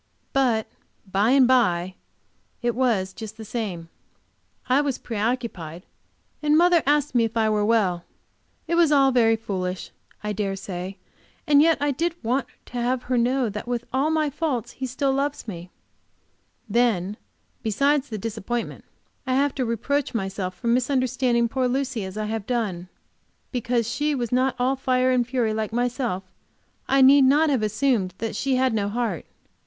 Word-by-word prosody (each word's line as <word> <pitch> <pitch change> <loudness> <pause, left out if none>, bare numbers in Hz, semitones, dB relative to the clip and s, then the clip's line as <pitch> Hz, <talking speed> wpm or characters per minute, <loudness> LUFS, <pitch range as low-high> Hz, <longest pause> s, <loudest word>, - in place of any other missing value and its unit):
But 245 -5 +2 0.5
"by 200 +4 +2
and 265 -1 +5
by" 185 -8 +2 0.7
it 240 0 +1
was 225 -7 0
just 220 0 -8
the 220 - -8
same. 200 -7 -4 0.8
I 260 +3 +4
was 280 -3 -1
preoccupied, 210 -7 -3 0.6
and 300 0 +3
mother 345 0 +5
asked 290 -1 +2
me 240 -2 +3
if 225 0 -2
I 220 -1 +3
were 210 -1 +1
well. 200 -6 +1 0.6
It - - -1
was 335 -3 +4
all 275 -2 +5
very 230 -3 +4
foolish 185 -4 -4 0.3
I 210 0 -2
dare 200 -1 -2
say, 190 0 -6 0.5
and 290 -1 +5
yet 325 0 +4
I 290 0 +1
did 335 +5 -1
want 250 +3 0 0.2
to 245 - -5
have 250 +1 0
her 250 0 0
know 250 +1 +1
that 210 +3 -6
with 240 -1 -2
all 270 +4 +2
my 310 -2 +1
faults 275 -6 -2
he 265 - -5
still 270 +2 0
loves 280 -1 -2
me. 175 -3 -7 1.0
Then, 210 -4 +1 0.5
besides 275 +6 +1
this 220 - -4
disappointment, 225 +2 -4 0.4
I 255 - +1
have 280 +1 +2
to 260 - -1
reproach 240 +4 -1
myself 190 -3 -3
for - - -12
misunderstanding 250 -1 +2
poor 255 +2 0
Lucy 260 -3 -1
as 190 +2 -7
I 215 - -2
have 215 -1 -4
done. 195 -8 -2 0.6
Because 245 -2 0
she 295 +5 0
was 240 -4 -3
not 255 +1 +2
all 255 +2 +1
fire 255 -1 +1
and 245 -2 +2
fury 245 -4 0
like 215 0 -2
myself, 240 -4 -1 0.6
I 270 0 +4
need 275 +1 +7
not 295 +3 +4
have 260 -5 +1
assumed 215 -3 0
that 225 -1 -4
she 265 +4 0
had 255 -1 +2
no 205 -2 0
heart. 220 -6 -2
240 Hz, 170 wpm, -24 LUFS, 215-265 Hz, 1.0 s, need